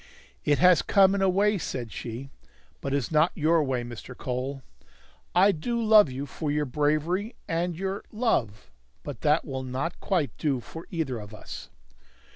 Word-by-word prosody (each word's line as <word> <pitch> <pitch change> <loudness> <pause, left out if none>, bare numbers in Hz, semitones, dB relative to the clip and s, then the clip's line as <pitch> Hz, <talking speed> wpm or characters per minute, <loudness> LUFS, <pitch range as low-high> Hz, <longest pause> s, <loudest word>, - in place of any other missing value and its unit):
"It 145 - +3
has 180 -2 +6
come, 195 -1 +5
in 200 - 0
a 190 - +4
way," 200 +2 +2
said 120 -7 -4
she; 125 +4 -6 0.5
"but 140 - -3
it 140 - +2
is 135 0 -3
not 155 +3 +4
your 160 0 +3
way, 130 -3 -1
Mr. 120 +1 -9
Cole. 130 +2 -4 0.7
I 190 +3 +6
do 235 +9 -2
love 215 -6 +6
you 130 +2 -4
for 150 +2 -4
your 150 0 +1
bravery 155 - 0
and 170 +1 -1
your 195 +2 -3
love 115 - -1 0.3
but 140 -5 -7
that 150 +1 +3
will 135 -2 -4
not 130 +6 -3
quite 175 -8 0
do 140 -4 +1
for 160 +7 -10
either 150 -8 -2
of 105 0 -9
us." - - -9
150 Hz, 175 wpm, -27 LUFS, 130-180 Hz, 0.7 s, has